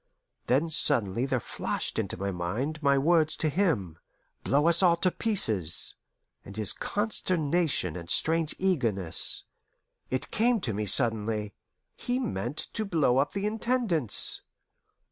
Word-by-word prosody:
Then 140 Hz, +6 st, +1 dB
suddenly 120 Hz, -6 st, +2 dB
there 130 Hz, -2 st, -1 dB
flashed -, -, -5 dB
into -, -, -4 dB
my 100 Hz, +1 st, -3 dB
mind 110 Hz, -, -4 dB
my 140 Hz, -2 st, +2 dB
words 160 Hz, +2 st, +2 dB
to 155 Hz, -, -2 dB
him, 135 Hz, -, -1 dB, 0.4 s
"blow 145 Hz, +4 st, +1 dB
us 170 Hz, +1 st, +4 dB
all 175 Hz, -3 st, +4 dB
to 185 Hz, +1 st, 0 dB
pieces," 110 Hz, -, +4 dB, 0.5 s
and 100 Hz, +2 st, -12 dB
his 110 Hz, -3 st, +1 dB
consternation 175 Hz, -, -1 dB
and 85 Hz, -1 st, -9 dB
strange 160 Hz, -1 st, +1 dB
eagerness. 115 Hz, -, +1 dB, 0.7 s
It 130 Hz, -, -3 dB
came 235 Hz, +1 st, +1 dB
to 115 Hz, -10 st, -3 dB
me 105 Hz, +1 st, -4 dB
suddenly: 105 Hz, -2 st, +1 dB, 0.4 s
he 245 Hz, +1 st, -3 dB
meant 145 Hz, -, -4 dB, 0.2 s
to 220 Hz, -, -3 dB
blow 155 Hz, -10 st, +1 dB
up 140 Hz, -, -1 dB
the 200 Hz, 0 st, -3 dB
Intendance. 215 Hz, -, 0 dB
140 Hz, 135 wpm, -27 LUFS, 105-175 Hz, 0.7 s, us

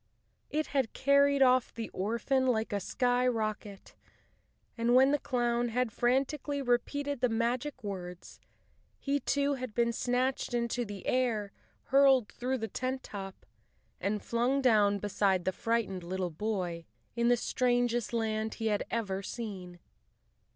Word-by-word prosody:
It 310 Hz, +1 st, 0 dB
had 270 Hz, -5 st, -1 dB
carried 280 Hz, 0 st, +4 dB
off 255 Hz, -1 st, +3 dB
the 230 Hz, -1 st, -6 dB
orphan 235 Hz, +6 st, 0 dB
like 225 Hz, -4 st, 0 dB
a 200 Hz, -, +1 dB
skyrocket, 225 Hz, -4 st, -1 dB, 0.8 s
and 235 Hz, +1 st, +2 dB
when 265 Hz, +2 st, +6 dB
the 290 Hz, -, +2 dB
clown 240 Hz, -2 st, 0 dB
had 245 Hz, 0 st, -1 dB
frantically 270 Hz, +5 st, 0 dB
repeated 275 Hz, +2 st, -1 dB
the 250 Hz, -, +3 dB
magic 245 Hz, +4 st, -1 dB
words, 180 Hz, -3 st, -7 dB, 0.6 s
he 285 Hz, 0 st, -1 dB
too 285 Hz, +2 st, +1 dB
had 255 Hz, -5 st, -6 dB
been 235 Hz, -1 st, +2 dB
snatched 250 Hz, +1 st, -1 dB
into 240 Hz, 0 st, -1 dB
the 205 Hz, -2 st, -8 dB
air, 230 Hz, -6 st, 0 dB, 0.3 s
hurled 270 Hz, -4 st, +4 dB
through 255 Hz, +2 st, -2 dB
the 225 Hz, -2 st, -3 dB
tent 255 Hz, +4 st, -3 dB
top, 195 Hz, -2 st, -8 dB, 0.5 s
and 205 Hz, +2 st, -2 dB
flung 245 Hz, +4 st, +1 dB
down 210 Hz, -6 st, +4 dB
beside 195 Hz, -2 st, 0 dB
the 185 Hz, -, +2 dB
frightened 210 Hz, -2 st, -1 dB
little 180 Hz, 0 st, -3 dB
boy 175 Hz, -2 st, -3 dB, 0.3 s
in 235 Hz, 0 st, +1 dB
the 245 Hz, 0 st, +4 dB
strangest 245 Hz, -1 st, 0 dB
land 220 Hz, -1 st, -1 dB
he 225 Hz, -1 st, -1 dB
had 205 Hz, -, 0 dB
ever 200 Hz, -4 st, -2 dB
seen. 190 Hz, -5 st, -6 dB
235 Hz, 140 wpm, -31 LUFS, 210-255 Hz, 0.8 s, when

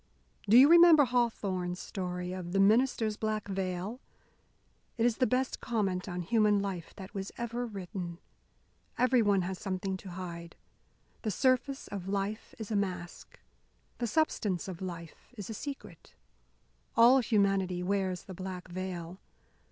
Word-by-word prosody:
"Do 225 Hz, -, +8 dB
you 265 Hz, +3 st, +9 dB
remember 335 Hz, -3 st, +8 dB
Hawthorne's 200 Hz, -7 st, -1 dB
story 180 Hz, -1 st, -4 dB
of 180 Hz, -1 st, -6 dB
'The 195 Hz, -, +2 dB
Minister's 220 Hz, +1 st, +3 dB
Black 215 Hz, -1 st, -2 dB
Veil?' 190 Hz, +4 st, -3 dB, 1.0 s
It 230 Hz, -, +2 dB
is 240 Hz, -2 st, +2 dB
the 255 Hz, -, +3 dB
best 255 Hz, +3 st, -1 dB
comment 195 Hz, -5 st, -1 dB
on 180 Hz, 0 st, -3 dB
human 210 Hz, +1 st, +3 dB
life 190 Hz, -4 st, -5 dB
that 190 Hz, -1 st, -9 dB, 0.3 s
ever 235 Hz, +1 st, -3 dB
was 220 Hz, -, -12 dB
written. 180 Hz, -2 st, -5 dB, 0.8 s
Everyone 225 Hz, -7 st, +3 dB
has 185 Hz, 0 st, -4 dB
something 190 Hz, -1 st, -3 dB
to 190 Hz, -, -10 dB
hide. 170 Hz, -2 st, -7 dB, 0.7 s
The 220 Hz, -, -2 dB
surface 260 Hz, +6 st, +1 dB
of 190 Hz, -2 st, -6 dB
life 200 Hz, +2 st, -3 dB
is 220 Hz, -1 st, -7 dB
a -, -, 0 dB
mask. 185 Hz, -3 st, -4 dB, 0.6 s
The 240 Hz, -, -1 dB
substance 215 Hz, -, 0 dB
of 185 Hz, -2 st, -7 dB
life 170 Hz, -3 st, -8 dB
is 205 Hz, +1 st, -6 dB
a -, -, -4 dB
secret. 210 Hz, -, -8 dB, 0.8 s
All 240 Hz, +3 st, +7 dB
humanity 195 Hz, -6 st, +1 dB
wears 185 Hz, -1 st, -1 dB
the 190 Hz, -, -9 dB
black 185 Hz, 0 st, -7 dB
veil. 180 Hz, -1 st, -5 dB
195 Hz, 145 wpm, -31 LUFS, 180-230 Hz, 1.0 s, you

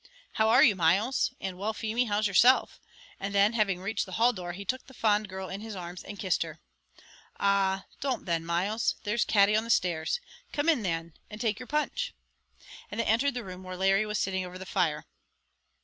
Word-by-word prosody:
"How 220 Hz, 0 st, +2 dB
are 225 Hz, -, +7 dB
you, 205 Hz, -, +5 dB
Myles?" 190 Hz, +12 st, +2 dB
and 185 Hz, -1 st, -5 dB
"Well, 215 Hz, +3 st, -1 dB
Feemy, 225 Hz, +3 st, -1 dB
how's 210 Hz, -1 st, 0 dB
yourself?" 235 Hz, +6 st, +4 dB, 0.4 s
and 200 Hz, +1 st, -4 dB
then, 200 Hz, +3 st, +4 dB
having 205 Hz, -5 st, +1 dB
reached 200 Hz, +3 st, -2 dB
the 185 Hz, -, -9 dB
hall 235 Hz, +5 st, +3 dB
door, 175 Hz, -4 st, -6 dB
he 200 Hz, +3 st, -8 dB
took 260 Hz, +6 st, -3 dB
the 265 Hz, -, -15 dB
fond 210 Hz, -2 st, +1 dB
girl 190 Hz, 0 st, -6 dB
in 195 Hz, +2 st, -6 dB
his 220 Hz, -1 st, -7 dB
arms 175 Hz, -1 st, -7 dB
and 200 Hz, -, -8 dB
kissed 190 Hz, -3 st, 0 dB
her. 165 Hz, -1 st, -4 dB, 0.8 s
"Ah; 195 Hz, -1 st, +2 dB
don't 270 Hz, -3 st, -2 dB
then, 165 Hz, -2 st, 0 dB
Myles; 185 Hz, +7 st, 0 dB
there's 215 Hz, +2 st, +1 dB
Katty 205 Hz, -1 st, +4 dB
on 220 Hz, -, +2 dB
the 230 Hz, -, -9 dB
stairs; 175 Hz, -, +1 dB, 0.3 s
come 290 Hz, +1 st, -1 dB
in 300 Hz, -8 st, +3 dB
then, 165 Hz, -4 st, -3 dB, 0.2 s
and 210 Hz, -, -9 dB
take 220 Hz, -2 st, -1 dB
your 255 Hz, -, -8 dB
punch;" 300 Hz, -, -1 dB, 0.7 s
and 205 Hz, -, -6 dB
they 230 Hz, -, +1 dB
entered 245 Hz, +5 st, +2 dB
the 245 Hz, -, -3 dB
room 185 Hz, -1 st, -8 dB
where 185 Hz, 0 st, -7 dB
Larry 195 Hz, +3 st, +2 dB
was 210 Hz, 0 st, -2 dB
sitting 190 Hz, -1 st, -1 dB
over 180 Hz, 0 st, -8 dB
the 190 Hz, -, -8 dB
fire. 170 Hz, -6 st, 0 dB
200 Hz, 210 wpm, -29 LUFS, 185-225 Hz, 0.8 s, are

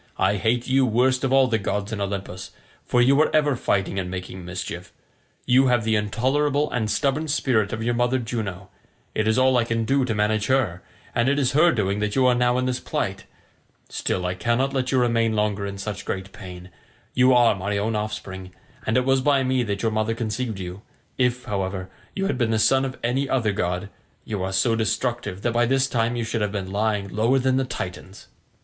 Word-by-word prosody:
I 105 Hz, -, +2 dB
hate 115 Hz, +4 st, 0 dB
you 135 Hz, +1 st, +3 dB
worst 130 Hz, +2 st, +2 dB
of 135 Hz, -, 0 dB
all 135 Hz, 0 st, +5 dB
the 115 Hz, -3 st, 0 dB
gods 105 Hz, +1 st, -2 dB
in 110 Hz, -2 st, -3 dB
Olympus, 100 Hz, -2 st, -4 dB, 0.4 s
for 120 Hz, 0 st, +3 dB
you 140 Hz, +4 st, +5 dB
are 155 Hz, -, +3 dB
ever 150 Hz, -3 st, +3 dB
fighting 95 Hz, -4 st, 0 dB
and 90 Hz, -1 st, -3 dB
making 90 Hz, 0 st, -6 dB
mischief. 90 Hz, +1 st, -6 dB, 0.5 s
You 130 Hz, +1 st, +4 dB
have 120 Hz, -3 st, +2 dB
the 110 Hz, 0 st, +1 dB
intolerable 140 Hz, +8 st, +1 dB
and 110 Hz, -3 st, -1 dB
stubborn 145 Hz, +6 st, 0 dB
spirit 120 Hz, -8 st, +1 dB
of 110 Hz, 0 st, -3 dB
your 120 Hz, +1 st, +1 dB
mother 120 Hz, +2 st, +1 dB
Juno: 105 Hz, -6 st, -4 dB, 0.4 s
it 110 Hz, -, 0 dB
is 110 Hz, -, +2 dB
all 130 Hz, 0 st, +4 dB
I 120 Hz, -, +3 dB
can 115 Hz, -1 st, -1 dB
do 135 Hz, +2 st, +2 dB
to 115 Hz, -4 st, -2 dB
manage 105 Hz, 0 st, +1 dB
her, 110 Hz, -10 st, +1 dB, 0.3 s
and 120 Hz, +3 st, +2 dB
it 140 Hz, -, +1 dB
is 135 Hz, -2 st, +2 dB
her 155 Hz, +5 st, +5 dB
doing 100 Hz, -4 st, 0 dB
that 105 Hz, 0 st, -1 dB
you 130 Hz, -1 st, +3 dB
are 125 Hz, -, +5 dB
now 125 Hz, 0 st, +2 dB
in 130 Hz, -, 0 dB
this 130 Hz, -1 st, -1 dB
plight: -, -, -3 dB, 0.6 s
still, 90 Hz, -, -2 dB
I 90 Hz, -, 0 dB
cannot 120 Hz, +8 st, 0 dB
let 130 Hz, -2 st, -1 dB
you 130 Hz, -, +2 dB
remain 115 Hz, -2 st, +2 dB
longer 105 Hz, -1 st, 0 dB
in 100 Hz, 0 st, -6 dB
such 100 Hz, 0 st, -5 dB
great 95 Hz, 0 st, -4 dB
pain; 90 Hz, -1 st, -10 dB, 0.4 s
you 125 Hz, +1 st, +4 dB
are 120 Hz, -3 st, +5 dB
my 100 Hz, +1 st, -2 dB
own 110 Hz, +2 st, -1 dB
offspring, 105 Hz, -3 st, -5 dB, 0.4 s
and 110 Hz, -, +2 dB
it 125 Hz, -, +2 dB
was 135 Hz, 0 st, +3 dB
by 140 Hz, -1 st, +3 dB
me 130 Hz, 0 st, +1 dB
that 100 Hz, -3 st, -3 dB
your 115 Hz, -, +1 dB
mother 110 Hz, +1 st, 0 dB
conceived 115 Hz, -1 st, -3 dB
you; 90 Hz, +1 st, -7 dB, 0.4 s
if, 125 Hz, -1 st, +1 dB
however, 95 Hz, -2 st, -3 dB, 0.2 s
you 195 Hz, -, -1 dB
had 195 Hz, -, -1 dB
been 120 Hz, -2 st, +1 dB
the 110 Hz, -, +1 dB
son 135 Hz, +4 st, +3 dB
of 130 Hz, -1 st, -5 dB
any 130 Hz, +3 st, 0 dB
other 115 Hz, -5 st, +1 dB
god, 90 Hz, -1 st, -2 dB, 0.4 s
you 105 Hz, -3 st, -3 dB
are 95 Hz, +1 st, -2 dB
so 95 Hz, +5 st, +2 dB
destructive 115 Hz, -2 st, -2 dB
that 120 Hz, -, 0 dB
by 120 Hz, 0 st, +2 dB
this 135 Hz, +1 st, +2 dB
time 120 Hz, -2 st, 0 dB
you 120 Hz, -, -1 dB
should 115 Hz, 0 st, -2 dB
have 105 Hz, -1 st, 0 dB
been 95 Hz, -2 st, -4 dB
lying 105 Hz, -1 st, 0 dB
lower 115 Hz, +7 st, +2 dB
than 130 Hz, 0 st, +2 dB
the 135 Hz, -, +1 dB
Titans." 95 Hz, -5 st, -7 dB
115 Hz, 220 wpm, -24 LUFS, 100-130 Hz, 0.6 s, all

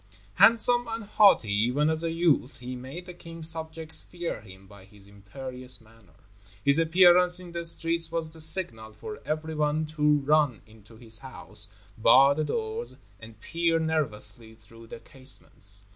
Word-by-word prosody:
Handsome 230 Hz, +4 st, +3 dB
and 225 Hz, 0 st, -6 dB
haughty, 200 Hz, -, +2 dB
even 125 Hz, +8 st, 0 dB
as 160 Hz, +1 st, -1 dB
a 165 Hz, -, -2 dB
youth, 160 Hz, -6 st, -1 dB
he 125 Hz, +1 st, -8 dB
made 135 Hz, +8 st, -10 dB
the 180 Hz, -, -11 dB
king's 165 Hz, -2 st, 0 dB
subjects 160 Hz, 0 st, 0 dB
fear 175 Hz, -10 st, -7 dB
him 95 Hz, -2 st, -16 dB
by 100 Hz, 0 st, -17 dB
his 100 Hz, 0 st, -10 dB
imperious 125 Hz, +5 st, -5 dB
manner. 110 Hz, -6 st, -24 dB, 0.5 s
His 140 Hz, +2 st, +3 dB
appearance 180 Hz, +2 st, +4 dB
in 180 Hz, -1 st, -9 dB
the 170 Hz, 0 st, -6 dB
streets 165 Hz, 0 st, +2 dB
was 165 Hz, -1 st, -3 dB
the 160 Hz, 0 st, -2 dB
signal 115 Hz, -, +2 dB
for 210 Hz, -, -10 dB
everyone 155 Hz, 0 st, -3 dB
to 150 Hz, 0 st, +2 dB
run 150 Hz, -5 st, +1 dB
into 110 Hz, 0 st, -20 dB
his 110 Hz, -2 st, -1 dB
house, 105 Hz, -6 st, +1 dB, 0.3 s
bar 135 Hz, +5 st, +5 dB
the 155 Hz, +2 st, -3 dB
doors, 445 Hz, -, -5 dB, 0.2 s
and 110 Hz, -1 st, -15 dB
peer 165 Hz, +6 st, -2 dB
nervously 130 Hz, -8 st, 0 dB
through 115 Hz, +1 st, -18 dB
the 115 Hz, -, -11 dB
casements. 110 Hz, -5 st, -1 dB
150 Hz, 160 wpm, -25 LUFS, 115-165 Hz, 0.5 s, bar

